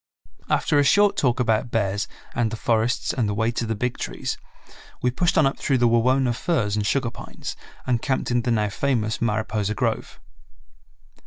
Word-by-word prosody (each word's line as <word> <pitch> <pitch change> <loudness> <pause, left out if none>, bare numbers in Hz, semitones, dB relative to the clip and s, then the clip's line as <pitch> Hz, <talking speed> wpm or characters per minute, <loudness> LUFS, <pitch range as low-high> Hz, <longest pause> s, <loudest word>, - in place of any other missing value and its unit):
After 145 - +2
a - - +5
short 205 +7 +4
talk 125 -3 +1
about 115 -1 +1
bears 100 -3 0 0.3
and 120 -2 +1
the 115 - -4
forests 115 +2 +1
and 115 -5 0
the 105 - -1
way 110 +2 +1
to 120 -1 -2
the 110 - -1
Big 125 +4 -2
Trees, - - -3 0.7
we 125 - +3
pushed 175 +7 +1
on 155 - +5
up 135 - 0
through 135 - +1
the 120 -1 +3
Wawona 125 +2 +3
firs 115 - 0
and 105 -1 0
sugar 125 0 +1
pines, - - -7 0.3
and 120 -3 +1
camped 130 -2 -1
in 120 0 +2
the 120 - -2
now 105 -3 +1
famous 115 -2 -1
Mariposa 110 -2 -1
grove. - - -2
120 Hz, 185 wpm, -24 LUFS, 110-130 Hz, 0.7 s, a